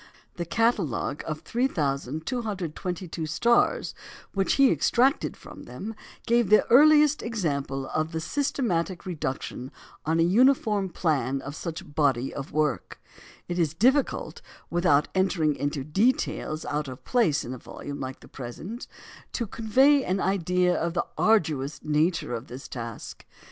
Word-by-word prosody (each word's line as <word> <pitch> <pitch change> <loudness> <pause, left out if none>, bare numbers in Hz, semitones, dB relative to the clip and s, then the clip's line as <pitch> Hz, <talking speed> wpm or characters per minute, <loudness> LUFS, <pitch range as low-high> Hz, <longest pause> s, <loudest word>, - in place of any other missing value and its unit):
The 170 - -2
catalogue 175 - 0
of 155 -1 -4
3,222 175 - -2
stars 235 +10 +2 0.4
which 195 -1 +1
he 275 -1 +5
extracted 265 +5 +2
from - - -12
them 220 +3 -7 0.3
gave 235 -3 +2
the 215 - +6
earliest 300 +2 +6
example 140 - -2
of 155 +1 -2
the 160 - -2
systematic 190 - -1
reduction 135 -6 -4 0.3
on 160 +2 +1
a - - +5
uniform 210 0 +3
plan 140 -6 0
of 145 - -6
such 165 +1 -5
a - - -14
body 140 -5 0
of 140 0 -6
work. 150 -1 -1 0.5
It 175 0 -2
is 160 -2 +1
difficult, 260 - +1 0.3
without 160 -4 +3
entering 180 -6 +1
into 145 0 -2
details 160 - 0
out 150 0 -2
of 130 -1 -9
place 210 - +2
in 125 - -5
a 130 - -8
volume 145 +4 -8
like 130 0 -6
the - - -14
present, 160 - -7 0.5
to 235 - -1
convey 265 +7 +3
an 190 -3 -1
idea 180 -1 +1
of 170 +1 -2
the 175 - +1
arduous 150 -10 +1
nature 155 -1 +1
of 120 +2 -5
this 130 +2 -9
task. 115 -3 -7
170 Hz, 140 wpm, -26 LUFS, 145-220 Hz, 0.5 s, the